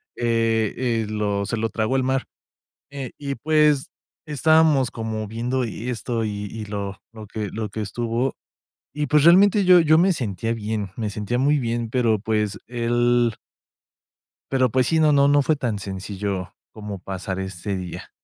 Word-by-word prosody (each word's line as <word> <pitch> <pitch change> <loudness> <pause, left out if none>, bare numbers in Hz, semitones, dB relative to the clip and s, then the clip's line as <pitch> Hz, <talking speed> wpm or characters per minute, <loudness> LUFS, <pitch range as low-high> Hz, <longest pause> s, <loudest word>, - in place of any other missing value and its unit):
eh 115 -2 +1
eh, 115 -3 0
lo 105 -2 -1
se 115 +2 -2
lo 115 +1 -1
tragó 110 +4 -1
el 130 - +1
mar, 130 0 0 0.6
eh, 135 -3 -6
y, 140 -1 -4
pues, 150 -2 +2 0.4
estábamos 150 -3 +3
como 110 -1 -4
viendo 120 +4 -2
esto 115 0 -3
y 105 -1 -4
y 110 -1 -6
lo 100 -1 -5
lo 110 -1 -10
que 105 -1 -4
lo 110 -1 -3
que 110 - -5
estuvo, 120 +4 -2 0.6
y, 150 +1 -2
pues, 150 0 +4
realmente 195 +4 +6
yo 180 -1 +8
yo 155 -1 +5
me 185 +3 +4
sentía 115 - -2
bien. 105 -2 -3
Me 110 -3 -2
sentía 105 +4 -2
muy 145 +3 +3
bien, 115 -1 -2
pero, 115 -3 +2
pues, 105 -1 -1
él 120 0 +1 1.2
Pero, 130 -2 +3
pues 130 0 +2
sí. 160 -1 +2
No 155 -1 +5
no 140 -1 +5
no 145 0 +4
fue 155 +2 +2
tan 120 -7 -2
sencillo, 95 -1 -4 0.2
como 105 -2 -7
pasar 95 0 -5
ese 95 +1 -4
día. 90 -2 -7
115 Hz, 170 wpm, -23 LUFS, 105-135 Hz, 1.2 s, yo